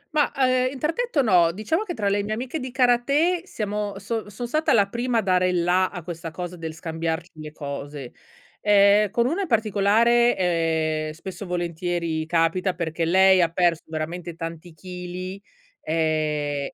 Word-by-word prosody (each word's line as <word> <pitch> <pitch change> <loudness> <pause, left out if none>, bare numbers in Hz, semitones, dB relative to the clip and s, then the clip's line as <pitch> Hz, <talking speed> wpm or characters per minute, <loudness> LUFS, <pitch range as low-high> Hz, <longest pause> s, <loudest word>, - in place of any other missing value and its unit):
Ma 295 - +3
ehm, 255 -2 +2
interdetto 305 - -1
no, 180 -7 +4
diciamo 215 - -1
che 355 -5 -5
tra 205 - -1
le 200 +1 +1
mie 210 +2 -3
amiche 250 +7 -4
di 260 -1 -5
karate 280 +8 +2
siamo 210 - -3
son 210 +2 -4
sono 235 +4 -6
stata 310 +5 +1
la 205 -3 +4
prima 240 +3 -1
a 225 - +3
dare 185 -1 +2
il 175 -1 +1
la 185 +1 +2
a 175 -3 -8
questa 165 0 -6
cosa 175 +2 -6
del 160 -2 -6
scambiarci 165 +1 -4
le 155 -1 -8
cose. 140 -3 -7 0.5
Ehm, 205 0 +5
con 235 +3 +1
una 330 +10 0
in 385 - -2
particolare, 225 +1 +3
ehm, 160 -3 0
spesso 185 +4 -8
e - - -10
volentieri 170 -2 -2
capita 175 +3 +1
perché 165 -1 -2
lei 190 +2 +5
ha 170 - +3
perso 170 -1 +1
veramente 165 +2 -5
tanti 165 0 -7
chili, 180 +2 -7 0.4
ehm, 150 -3 -1
185 Hz, 170 wpm, -24 LUFS, 165-225 Hz, 0.5 s, Ehm